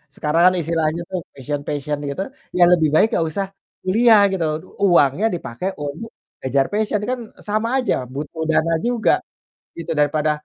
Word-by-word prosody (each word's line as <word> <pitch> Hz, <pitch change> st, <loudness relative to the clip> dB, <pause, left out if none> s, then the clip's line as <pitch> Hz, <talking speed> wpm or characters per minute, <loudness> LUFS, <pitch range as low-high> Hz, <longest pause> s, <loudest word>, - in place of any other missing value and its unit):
sekarang 155 Hz, +3 st, +1 dB
kan -, -, -3 dB
istilahnya 165 Hz, 0 st, -1 dB
tuh 185 Hz, -, -1 dB, 0.2 s
passion-passion 145 Hz, +1 st, -3 dB
gitu, 140 Hz, +7 st, -3 dB, 0.4 s
ya 175 Hz, -, +6 dB
lebih 160 Hz, -4 st, +4 dB
baik 210 Hz, -, +5 dB
nggak 165 Hz, -, +1 dB
usah 195 Hz, +5 st, -2 dB, 0.4 s
kuliah 220 Hz, +3 st, +5 dB
gitu, 190 Hz, -3 st, -1 dB, 0.4 s
uangnya 170 Hz, +3 st, +4 dB
dipakai 170 Hz, +5 st, -4 dB
untuk 150 Hz, +10 st, -6 dB, 0.3 s
kejar 135 Hz, +1 st, +2 dB
passion, 210 Hz, 0 st, 0 dB
kan 255 Hz, -1 st, -1 dB, 0.3 s
sama 215 Hz, +2 st, 0 dB
aja, 255 Hz, -, +1 dB, 0.2 s
butuh 155 Hz, +3 st, -5 dB
dana 165 Hz, +1 st, +2 dB
juga 240 Hz, -2 st, +2 dB, 0.6 s
gitu, 165 Hz, 0 st, -5 dB
daripada, 150 Hz, +1 st, +2 dB
165 Hz, 150 wpm, -20 LUFS, 150-205 Hz, 0.6 s, ya